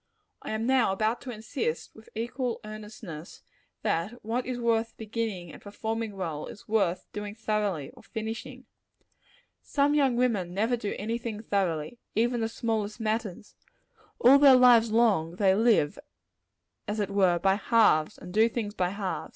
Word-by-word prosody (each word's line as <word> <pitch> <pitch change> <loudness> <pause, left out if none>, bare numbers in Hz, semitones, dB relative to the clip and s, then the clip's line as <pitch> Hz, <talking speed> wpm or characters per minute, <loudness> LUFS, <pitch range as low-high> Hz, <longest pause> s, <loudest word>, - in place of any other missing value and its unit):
I - - -7
am 220 +1 -2
now 255 -5 +3
about 215 +4 0
to 260 - -8
insist, 220 - -4
with 220 - -16
equal 240 +2 -2
earnestness, 210 -6 -9 0.4
that 170 +7 0
what 240 +3 -2
is 250 -1 -3
worth 230 -1 0
beginning 215 -6 -4
and - - -12
performing 220 +1 -4
well, 165 -6 -4
is - - -12
worth 195 -5 +1
doing 205 0 -5
thoroughly, 210 -9 -2
or - - -17
finishing. 230 +4 -6 1.0
Some 285 0 +1
young 275 -4 +3
women 210 -8 0
never 225 +5 +1
do 210 -4 -4
any 225 +3 -2
thing 225 -2 -5
thoroughly 190 -1 -1 0.2
even 235 +2 +1
the 225 - 0
smallest 220 -2 -2
matters. 215 -3 -3 0.6
All 270 +3 +7
their 280 -2 +8
lives 245 -3 +6
long, 205 -8 +2
they 195 0 +3
live, 215 - +3 0.9
as 210 +1 -2
it 200 -1 -1
were, 190 -3 +3
by 190 +2 +3
halves, 210 -7 +3
and 180 0 -10
do 220 +2 +4
things 220 -3 -3
by 180 -4 0
halves. 195 0 -4
220 Hz, 160 wpm, -28 LUFS, 195-235 Hz, 1.0 s, their